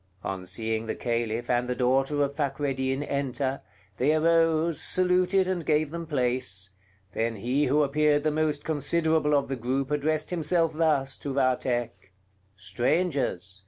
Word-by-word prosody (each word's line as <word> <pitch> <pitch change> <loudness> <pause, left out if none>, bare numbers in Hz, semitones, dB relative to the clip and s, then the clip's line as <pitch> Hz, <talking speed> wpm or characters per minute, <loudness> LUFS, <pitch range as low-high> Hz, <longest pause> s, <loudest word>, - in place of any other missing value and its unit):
On 95 -1 -5
seeing 110 +3 -3
the - - -2
Caliph 115 -1 -2
and 125 0 0
the 125 - -1
daughter 135 +3 +1
of 140 0 -3
Fakreddin 135 -2 -1
enter, 140 -1 -2 0.4
they 145 +5 +2
arose, 165 0 +2
saluted 185 +1 +3
and 185 -2 -2
gave 155 -1 +1
them 170 0 -6
place; 125 - -2 0.4
then 115 0 -1
he 125 +8 0
who 150 +3 +3
appeared 145 +1 +2
the 155 - +1
most 150 -1 -1
considerable 160 0 +1
of 140 - +1
the 135 - -3
group 130 +3 -2
addressed 150 +2 -1
himself 165 -1 +1
thus 150 -4 0
to 140 -2 -5
Vathek: 120 -6 -1 0.4
"Strangers! 105 - -1
140 Hz, 145 wpm, -27 LUFS, 125-155 Hz, 0.4 s, saluted